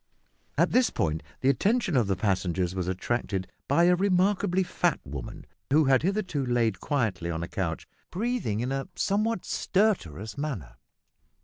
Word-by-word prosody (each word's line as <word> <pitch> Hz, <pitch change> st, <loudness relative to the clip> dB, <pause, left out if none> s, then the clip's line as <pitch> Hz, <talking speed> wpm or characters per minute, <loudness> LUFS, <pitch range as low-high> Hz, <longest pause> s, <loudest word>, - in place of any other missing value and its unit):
At -, -, +3 dB
this 250 Hz, -2 st, +4 dB
point 80 Hz, 0 st, -1 dB, 0.2 s
the 130 Hz, -, +3 dB
attention 200 Hz, -, +2 dB
of 120 Hz, -5 st, +3 dB
the 95 Hz, -, +1 dB
passengers 90 Hz, -2 st, 0 dB
was 90 Hz, -2 st, -2 dB
attracted 95 Hz, 0 st, -2 dB, 0.2 s
by 170 Hz, -, +4 dB
a 180 Hz, +1 st, +5 dB
remarkably 190 Hz, 0 st, +2 dB
fat 175 Hz, -1 st, 0 dB
woman, 70 Hz, -3 st, -7 dB, 0.3 s
who 150 Hz, +2 st, +5 dB
had 130 Hz, -1 st, +4 dB
hitherto 185 Hz, -6 st, -1 dB
lain 120 Hz, -3 st, +2 dB
quietly 110 Hz, -, -1 dB
on 80 Hz, 0 st, -2 dB
a -, -, -4 dB
couch 85 Hz, -4 st, -3 dB, 0.2 s
breathing 215 Hz, -, -1 dB
in 125 Hz, +2 st, -2 dB
a 135 Hz, 0 st, -2 dB
somewhat 210 Hz, +1 st, 0 dB
stertorous 140 Hz, -, 0 dB
manner. 95 Hz, -, -4 dB
130 Hz, 150 wpm, -27 LUFS, -, 0.3 s, a